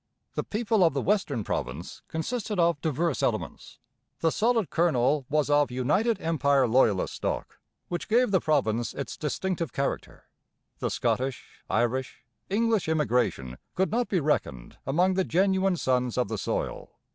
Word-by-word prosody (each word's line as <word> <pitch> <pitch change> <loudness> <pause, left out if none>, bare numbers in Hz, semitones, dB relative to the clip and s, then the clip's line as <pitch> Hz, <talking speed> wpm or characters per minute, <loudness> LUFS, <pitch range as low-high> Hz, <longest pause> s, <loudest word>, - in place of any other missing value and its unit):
The - - -2
people 215 -2 +1
of 165 -4 +3
the - - +1
western 175 - 0
province 75 -1 -4
consisted 210 +5 -3
of 170 -4 +2
diverse 160 -3 0
elements. - - -3 0.4
The 165 - +3
solid 225 -1 +1
kernel 145 -4 +2
was 150 0 +2
of 145 0 +3
United 185 - +1
Empire 140 -5 +2
Loyalist 110 -5 +2
stock, - - -4 0.3
which 175 - -4
gave 235 0 +3
the 190 - +4
province 120 -7 0
its 140 - -5
distinctive 165 0 -2
character. 135 0 -3 0.6
The - - -1
Scottish, 130 0 -2
Irish, 120 +3 -1 0.2
English 220 -3 +1
immigration 125 - 0 0.2
could 190 +1 +1
not 240 +2 +1
be 190 - +2
reckoned 65 - -2
among 180 +7 +3
the 190 0 +1
genuine 190 +1 +2
sons 125 -4 0
of 125 - +1
the 110 - -2
soil. - - -3
155 Hz, 145 wpm, -27 LUFS, 130-190 Hz, 0.6 s, the